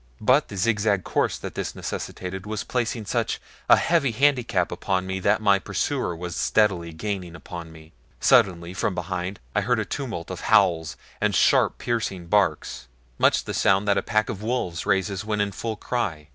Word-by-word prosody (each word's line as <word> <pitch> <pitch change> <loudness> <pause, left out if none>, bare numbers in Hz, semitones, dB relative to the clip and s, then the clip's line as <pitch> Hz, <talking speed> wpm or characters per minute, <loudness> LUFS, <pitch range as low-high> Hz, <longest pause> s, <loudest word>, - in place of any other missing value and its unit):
But 130 +7 +3
the 100 - -8
zigzag 105 -1 +1
course - - 0
that - - -7
this - - -4
necessitated 95 +2 -5
was 110 -1 -3
placing 120 -3 -2
such 115 +2 -1 0.3
a - - +10
heavy 165 -5 +2
handicap 120 -7 +2
upon 95 +1 -1
me 95 0 -3
that 100 - +1
my 100 -2 +5
pursuer 90 -1 -2
was 90 +1 -6
steadily 95 -6 +1
gaining 90 0 -4
upon 85 -2 -8
me. 80 0 -15 0.3
Suddenly 85 -2 +3
from 95 0 -1
behind 90 +2 -4
I 105 - +2
heard 125 +4 +1
a 110 - -1
tumult 115 -12 -5
of 95 - -6
howls, 90 -7 +3 0.2
and 105 -2 +2
sharp, - - +4
piercing 110 -7 -2
barks 85 -9 0 0.3
much - - +4
the - - -5
sound 100 +1 +2
that 100 -1 +3
a - - -3
pack 110 0 +1
of 100 - -5
wolves 105 -7 -2
raises 95 0 0
when 105 0 -2
in 100 0 +1
full 110 +3 -4
cry. 85 -10 -3
100 Hz, 180 wpm, -24 LUFS, 90-110 Hz, 0.3 s, a